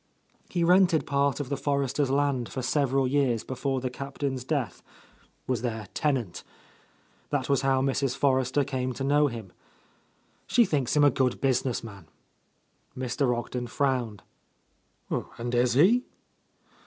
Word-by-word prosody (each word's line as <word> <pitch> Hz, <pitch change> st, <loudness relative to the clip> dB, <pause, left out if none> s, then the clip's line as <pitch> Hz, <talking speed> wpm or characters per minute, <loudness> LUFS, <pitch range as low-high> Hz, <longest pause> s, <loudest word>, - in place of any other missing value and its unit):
He 175 Hz, -2 st, 0 dB
rented 180 Hz, -2 st, +4 dB
part 140 Hz, -1 st, +1 dB
of 140 Hz, -3 st, -4 dB
the 140 Hz, -, 0 dB
Forresters' 140 Hz, -1 st, 0 dB
land 135 Hz, -3 st, 0 dB
for 130 Hz, -, -5 dB
several 135 Hz, 0 st, +1 dB
years 130 Hz, -4 st, +1 dB
before 130 Hz, 0 st, -2 dB
the 130 Hz, -1 st, -3 dB
Captain's 135 Hz, 0 st, -4 dB
death, 135 Hz, -3 st, -2 dB, 0.3 s
— -, -, -34 dB
^was 125 Hz, -4 st, -1 dB
their 110 Hz, -5 st, -4 dB
tenant. 130 Hz, -, -1 dB, 0.9 s
That 140 Hz, -3 st, -1 dB
was 140 Hz, -2 st, +2 dB
how 135 Hz, -1 st, +2 dB
Mrs. 135 Hz, -1 st, 0 dB
Forrester 130 Hz, 0 st, +2 dB
came 130 Hz, -2 st, -2 dB
to 135 Hz, -, -5 dB
know 145 Hz, +2 st, +3 dB
him. 115 Hz, -7 st, -7 dB, 0.9 s
She 240 Hz, -2 st, +4 dB
thinks 145 Hz, -, 0 dB
him 145 Hz, -, +5 dB
a 145 Hz, -, +6 dB
good 130 Hz, -2 st, 0 dB
business 130 Hz, -2 st, 0 dB
man." 100 Hz, -7 st, -11 dB, 0.9 s
Mr. 125 Hz, 0 st, 0 dB
Ogden 120 Hz, +1 st, -4 dB
frowned. 125 Hz, -6 st, -1 dB, 1.1 s
"And 120 Hz, +1 st, -4 dB
is 120 Hz, 0 st, +3 dB
he?" 215 Hz, -, +5 dB
135 Hz, 140 wpm, -27 LUFS, 125-140 Hz, 1.1 s, a